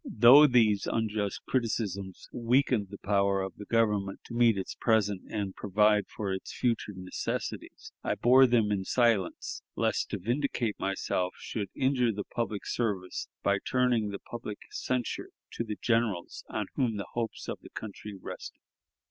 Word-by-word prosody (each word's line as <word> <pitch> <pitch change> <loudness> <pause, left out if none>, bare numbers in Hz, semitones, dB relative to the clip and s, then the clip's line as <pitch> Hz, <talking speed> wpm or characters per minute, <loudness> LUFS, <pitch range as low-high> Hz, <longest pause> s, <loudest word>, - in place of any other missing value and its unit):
Though 125 +7 +8
these 110 -6 +3
unjust 110 -3 -1
criticisms 100 -6 -2
weakened 120 -2 +2
the 100 - -8
power 100 -1 +1
of 95 - -6
the 105 - -9
Government 105 -4 +1
to - - -10
meet 115 -3 +4
its 95 - -4
present 105 -4 +1
and 100 -3 -2
provide 105 +1 +3
for 100 -3 -3
its 95 - -5
future 115 -4 -1
necessities, 90 0 -5
I - - 0
bore 125 +5 +6
them 115 -4 +3
in 100 -2 0
silence, 115 -3 +1
lest - - 0
to - - -2
vindicate 120 0 -1
myself 90 -1 -1
should 100 -4 -4
injure 130 -3 +2
the 105 -1 -4
public 110 -3 -3
service 100 -6 -2 0.2
by 100 0 +2
turning 125 -4 +1
the 100 - -4
public 110 -1 -7
censure 125 -2 -2 0.2
to - - -3
the 105 -2 -5
generals 115 -7 0
on - - -2
whom 120 -5 0
the 100 - -4
hopes 115 -2 -3
of - - -4
the - - -12
country 105 -1 -8
rested. - - -8
105 Hz, 155 wpm, -29 LUFS, 100-120 Hz, 0.2 s, Though